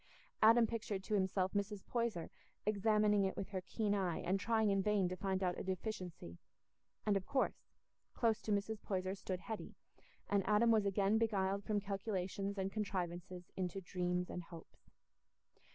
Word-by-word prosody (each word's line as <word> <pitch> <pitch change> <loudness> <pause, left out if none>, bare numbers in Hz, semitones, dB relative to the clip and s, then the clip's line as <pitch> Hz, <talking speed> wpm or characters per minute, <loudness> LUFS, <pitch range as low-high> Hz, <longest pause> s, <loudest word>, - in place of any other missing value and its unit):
Adam 230 +2 +7
pictured 215 -3 -3
to 215 - -3
himself 190 -1 +1
Mrs. 200 -1 -2
Poyser 230 -8 -1 0.3
examining 210 0 +3
it 190 - -1
with 195 - -3
her 190 -2 -3
keen 205 +2 -1
eye 185 -4 0
and 185 +3 0
trying 220 0 +2
in 195 0 +3
vain 205 -2 +2
to 180 - -3
find 190 0 -1
out 180 -1 0
a - - -3
deficiency; 185 - -4 0.7
and, 210 - +3
of 195 -1 -1
course, 270 - 0 0.5
close 225 -3 +2
to 215 - -3
Mrs. 205 +1 0
Poyser 185 -1 -1
stood 185 -2 -4
Hetty, 220 +2 -6 0.5
and 200 -1 +2
Adam 215 +3 +5
was 215 -3 +4
again 200 +2 +3
beguiled 200 -3 +1
from 210 0 +1
calculations 195 0 -2
and 190 0 -1
contrivances 180 -3 -3
into 185 0 -2
dreams 180 -1 -1
and 180 - -4
hopes. 165 -1 -13
195 Hz, 165 wpm, -37 LUFS, 185-210 Hz, 0.7 s, Adam